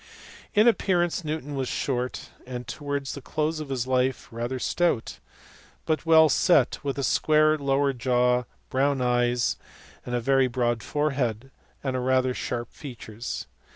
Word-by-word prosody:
In 210 Hz, +3 st, +6 dB
appearance 180 Hz, -6 st, +2 dB
Newton 150 Hz, -2 st, -4 dB
was 135 Hz, -2 st, -2 dB
short, 125 Hz, -1 st, -3 dB, 0.2 s
and 125 Hz, -1 st, -6 dB
towards 140 Hz, -2 st, -4 dB
the 140 Hz, -, -7 dB
close 155 Hz, +3 st, -2 dB
of 150 Hz, -2 st, -6 dB
his 130 Hz, -3 st, -1 dB
life 130 Hz, 0 st, 0 dB
rather 120 Hz, +3 st, -3 dB
stout, 165 Hz, -2 st, 0 dB, 0.7 s
but 160 Hz, +1 st, -1 dB
well 160 Hz, -1 st, +7 dB
set, 175 Hz, +5 st, +3 dB
with 140 Hz, -1 st, -2 dB
a 140 Hz, -, -1 dB
square 155 Hz, +2 st, +3 dB
lower 140 Hz, -1 st, +1 dB
jaw, 125 Hz, 0 st, +2 dB, 0.3 s
brown 135 Hz, +1 st, +2 dB
eyes, 120 Hz, -1 st, +1 dB, 0.5 s
a 125 Hz, 0 st, -2 dB
very 135 Hz, +2 st, +3 dB
broad 120 Hz, -2 st, 0 dB
forehead, 135 Hz, -5 st, -1 dB, 0.3 s
and 130 Hz, -2 st, -1 dB
rather 130 Hz, 0 st, +2 dB
sharp 120 Hz, -1 st, -4 dB
features. 120 Hz, -4 st, -7 dB
130 Hz, 140 wpm, -26 LUFS, 125-150 Hz, 0.7 s, well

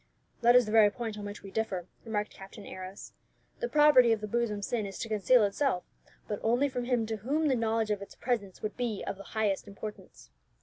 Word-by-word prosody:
"That 240 Hz, +1 st, +6 dB
is 250 Hz, -1 st, +7 dB
the 210 Hz, -, -4 dB
very 215 Hz, -2 st, +7 dB
point 225 Hz, 0 st, -5 dB
on 205 Hz, -, -6 dB
which 205 Hz, +1 st, -7 dB
we 195 Hz, -, -9 dB
differ," 195 Hz, -5 st, -2 dB, 0.2 s
remarked 210 Hz, -2 st, -2 dB
Captain 195 Hz, +1 st, -11 dB
Arrows. 185 Hz, +1 st, -9 dB, 0.5 s
"The 485 Hz, -, -2 dB
property 295 Hz, -6 st, +6 dB
of 225 Hz, -, +2 dB
the 210 Hz, -, -5 dB
bosom 215 Hz, -2 st, -1 dB
sin 220 Hz, -1 st, -1 dB
is 195 Hz, -, -8 dB
to -, -, -4 dB
conceal 220 Hz, +2 st, +4 dB
itself, 205 Hz, -1 st, +1 dB, 0.4 s
but 210 Hz, -, -3 dB
only 245 Hz, +5 st, +2 dB
from 250 Hz, -2 st, -3 dB
him 240 Hz, -2 st, +1 dB
to 220 Hz, 0 st, -3 dB
whom 290 Hz, +9 st, 0 dB
the 265 Hz, -, +3 dB
knowledge 225 Hz, -2 st, 0 dB
of 205 Hz, -1 st, -1 dB
its 200 Hz, -, -10 dB
presence 220 Hz, -6 st, -3 dB
would 215 Hz, -, -3 dB
be 235 Hz, -5 st, -2 dB
of -, -, -4 dB
the -, -, -9 dB, 0.2 s
highest 210 Hz, -2 st, 0 dB
importance. 210 Hz, +1 st, -9 dB
220 Hz, 220 wpm, -30 LUFS, 205-245 Hz, 0.5 s, is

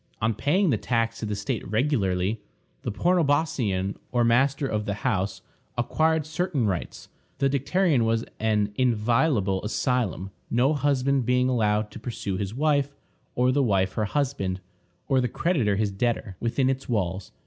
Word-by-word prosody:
On 110 Hz, +1 st, +1 dB
paying 160 Hz, -, +2 dB
the 110 Hz, -, +1 dB
tax 115 Hz, -2 st, -1 dB
to 110 Hz, -, -3 dB
the 105 Hz, -, -2 dB
state 100 Hz, -1 st, -3 dB
regularly, 105 Hz, -4 st, 0 dB, 0.4 s
the -, -, -3 dB
pornobosceion, 140 Hz, -, +1 dB
or 120 Hz, -1 st, +2 dB
master 135 Hz, +4 st, +2 dB
of 105 Hz, -5 st, -2 dB
the 100 Hz, -, -2 dB
house, 100 Hz, -6 st, -1 dB, 0.3 s
acquired 160 Hz, +5 st, +1 dB
certain 155 Hz, -4 st, -1 dB
rights. 95 Hz, -4 st, -3 dB, 0.3 s
The 135 Hz, -1 st, +1 dB
dicterion 145 Hz, 0 st, +2 dB
was 115 Hz, 0 st, +1 dB
an 105 Hz, -1 st, +1 dB
inviolable 115 Hz, -4 st, +2 dB
asylum, 105 Hz, -4 st, -1 dB, 0.2 s
no 130 Hz, +5 st, +3 dB
husband 140 Hz, -3 st, +1 dB
being 125 Hz, 0 st, +3 dB
allowed 105 Hz, -3 st, +1 dB
to -, -, -9 dB
pursue 110 Hz, -5 st, -4 dB
his 100 Hz, +3 st, -4 dB
wife, 140 Hz, -1 st, +1 dB, 0.4 s
or 125 Hz, +1 st, +3 dB
the 140 Hz, +2 st, +2 dB
wife 95 Hz, -6 st, +1 dB
her 110 Hz, -, 0 dB
husband, 105 Hz, -8 st, -1 dB, 0.5 s
or 130 Hz, -1 st, +3 dB
the 125 Hz, -, +1 dB
creditor 130 Hz, -, +1 dB
his 105 Hz, 0 st, 0 dB
debtor, 100 Hz, -1 st, -1 dB
within 125 Hz, +3 st, 0 dB
its 135 Hz, 0 st, -2 dB
walls. 95 Hz, -4 st, -2 dB
120 Hz, 155 wpm, -26 LUFS, 105-140 Hz, 0.5 s, no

